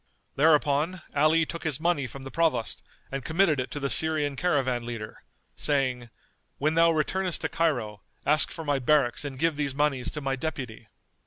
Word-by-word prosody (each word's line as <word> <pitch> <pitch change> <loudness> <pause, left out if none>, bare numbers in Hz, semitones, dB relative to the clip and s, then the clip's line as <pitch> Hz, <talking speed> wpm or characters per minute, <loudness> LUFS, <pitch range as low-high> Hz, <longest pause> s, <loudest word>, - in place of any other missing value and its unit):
Thereupon 150 +3 +2
Ali 155 +3 +4
took 170 +1 -7
his 155 -5 -1
money 160 -5 0
from 135 +3 -10
the 135 - -8
Provost 155 -9 0 0.3
and 135 -1 -4
committed 160 -2 +2
it 130 - -3
to 145 - -5
the 140 - -1
Syrian 150 -1 +3
caravan 135 -8 0
leader, 115 -3 -7 0.3
saying, 130 -4 -1 0.5
"When 155 +2 +1
thou 165 +1 +5
returnest 175 +3 0
to - - -1
Cairo, 120 -11 -1 0.2
ask 150 +2 +3
for 160 - -7
my 145 -2 +1
barracks 135 -1 +2
and 140 -2 -5
give 160 +1 +1
these 140 -3 -2
monies 140 -3 0
to 150 - -5
my 135 -2 -1
deputy." 130 -6 -6
145 Hz, 175 wpm, -27 LUFS, 130-160 Hz, 0.5 s, thou